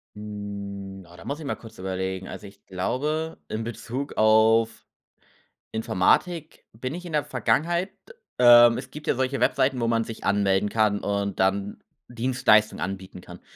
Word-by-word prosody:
Hm. 100 -2 -7
Oh, - - -14
da - - -13
muss 145 +2 -4
ich 155 - -8
mal 140 - -2
kurz 115 - -14
überlegen. 95 0 -3
Also, 105 - -8
ich 100 0 -18
glaube, 150 - -2
in 110 +1 -4
Bezug 120 +4 -5
auf 110 +1 +4 0.9
Informatik 155 - 0
bin 130 +5 -5
ich 180 +1 -8
in 170 - -7
der 150 -1 +2
Vergangenheit 165 - 0 0.5
ähm, 120 -1 +8
es - - -7
gibt 150 0 -10
ja - - +2
solche 130 0 -1
Webseiten, 130 0 +2
wo 115 - +1
man 115 -1 +1
sich 115 - -8
anmelden 100 0 +2
kann 105 -1 +2
und 100 -1 -2
dann 100 +1 0 0.2
Dienstleistungen 120 - +2
anbieten 95 +1 -5
kann. - - -12
110 Hz, 160 wpm, -25 LUFS, 100-130 Hz, 0.9 s, ähm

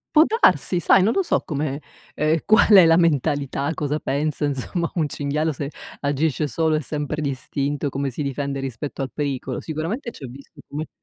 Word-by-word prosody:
Può 310 - +9
darsi, 430 - +3
sai, 185 +3 +5
non 220 - +2
lo 390 - +2
so 355 - +1
come 150 -1 -3 0.3
ehm 155 +2 +2
qual 220 +1 +5
è 190 -5 +9
la 165 0 +5
mentalità, 145 -3 +1
cosa 150 0 -2
pensa 145 +2 -1
insomma 145 +5 -2
un 160 -3 +1
cinghiale 150 +2 -1
se 140 +1 -4 0.3
agisce 145 +1 0
solo 160 +5 +1
e 155 - 0
sempre 150 +1 -3
d'istinto, 140 +1 -2
come 140 +1 -2
si 145 +4 -4
difende 140 0 -3
rispetto 135 +2 -5
al 130 - -3
pericolo. 135 -3 -3
Sicuramente 165 - -4
ci 150 - -13
ha - - -5
visto 135 +3 -13
come 150 +2 -5
150 Hz, 185 wpm, -22 LUFS, 140-160 Hz, 0.3 s, Può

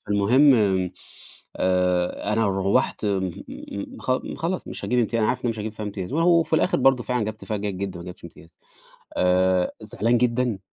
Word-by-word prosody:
فالمهم 120 +8 +5 1.0
آآ، 90 -1 0
أنا 115 -1 +2
روّحت 95 +2 0
م 95 -2 0 0.7
خ 130 - 0 0.2
خلاص 175 +3 -3
مش - - -5
هاجيب 125 - 0
امتيا 115 -1 +1
أنا 110 - +2
عارف 125 - 0
إن - - -23
أنا 120 - +2
مش 110 - -6
هاجيب 105 0 -4
فيها 110 -1 -6
امتياز، 95 -1 -5
وأهو 165 +2 +4
في 160 - -15
الآخر 180 - +2
برضه 135 -2 +4
فعلًا 125 -3 -1
جِبت 110 0 -6
فيها 110 - -2
جيد 100 -1 -3
جدًا، 95 -3 -4
ما 85 - -10
جِبتش 90 -1 -10
امتياز، 85 -1 -13 0.7
آآ، 90 0 +2
زعلان 110 +2 0
جدًا، 120 -3 0
105 Hz, 185 wpm, -24 LUFS, 95-125 Hz, 1.0 s, فالمهم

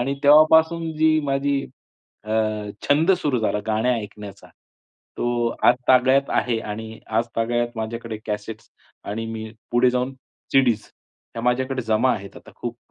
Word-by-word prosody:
आणि 135 +3 -1
तेव्हापासून 160 +2 +5
जी 155 0 +3
माझी 140 0 0 0.6
अ, 110 - -8 0.6
छंद 155 +5 +4
सुरू 150 -8 0
झाला 110 -2 0
गाण्या 110 +3 +1
ऐकण्याचा, 105 -2 -9 0.7
तो 120 -1 0 0.2
आजतागयत 130 +2 +3
आहे 120 -2 +1
आणि 110 +1 -7
आजतागयात 115 +1 -1
माझ्याकडे 115 0 -4
कॅसेट्स 105 +1 -6 0.3
आणि 110 +2 -4
मी 110 0 -6 0.2
पुढे 125 +1 +4
जाऊन 125 +1 -1 0.4
सी-डीज 120 -5 +3 0.5
त्या 115 - -5
माझ्याकडे 130 +1 0
जमा 110 +3 +2
आहेत 100 -1 -9
आता - - -13
खूप. 120 0 -5
120 Hz, 130 wpm, -22 LUFS, 110-135 Hz, 0.7 s, तेव्हापासून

